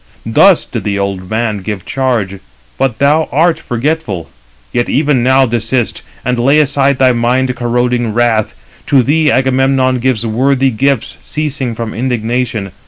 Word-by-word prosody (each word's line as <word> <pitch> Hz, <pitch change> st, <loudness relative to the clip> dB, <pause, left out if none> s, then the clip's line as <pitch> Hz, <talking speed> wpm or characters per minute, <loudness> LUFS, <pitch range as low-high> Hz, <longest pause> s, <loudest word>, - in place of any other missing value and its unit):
Thus 170 Hz, -, +4 dB
did 115 Hz, -5 st, -5 dB
the 100 Hz, 0 st, -1 dB
old 100 Hz, -2 st, -3 dB
man 110 Hz, -1 st, -1 dB
give 100 Hz, -1 st, -5 dB
charge, 115 Hz, -8 st, -1 dB, 0.4 s
but 130 Hz, -4 st, 0 dB
thou 150 Hz, +4 st, +2 dB
art 160 Hz, +3 st, +2 dB
forgetful. 120 Hz, -, -3 dB, 0.4 s
Yet 120 Hz, -, 0 dB
even 140 Hz, -2 st, +2 dB
now 130 Hz, +2 st, +4 dB
desist, 120 Hz, 0 st, -1 dB, 0.2 s
and 125 Hz, 0 st, 0 dB
lay 135 Hz, +5 st, +3 dB
aside 140 Hz, -2 st, +2 dB
thy 130 Hz, -1 st, +4 dB
mind 125 Hz, +2 st, 0 dB
corroding 120 Hz, -1 st, 0 dB
wrath. 115 Hz, -1 st, +1 dB, 0.3 s
To 135 Hz, -3 st, +4 dB
thee 150 Hz, +4 st, +2 dB
Agamemnon 130 Hz, 0 st, +2 dB
gives 120 Hz, -2 st, 0 dB
worthy 130 Hz, +4 st, +1 dB
gifts, 135 Hz, +2 st, -1 dB
ceasing 140 Hz, -6 st, -3 dB
from 115 Hz, -1 st, -5 dB
indignation. 115 Hz, -3 st, -2 dB
125 Hz, 145 wpm, -13 LUFS, 115-135 Hz, 0.4 s, Thus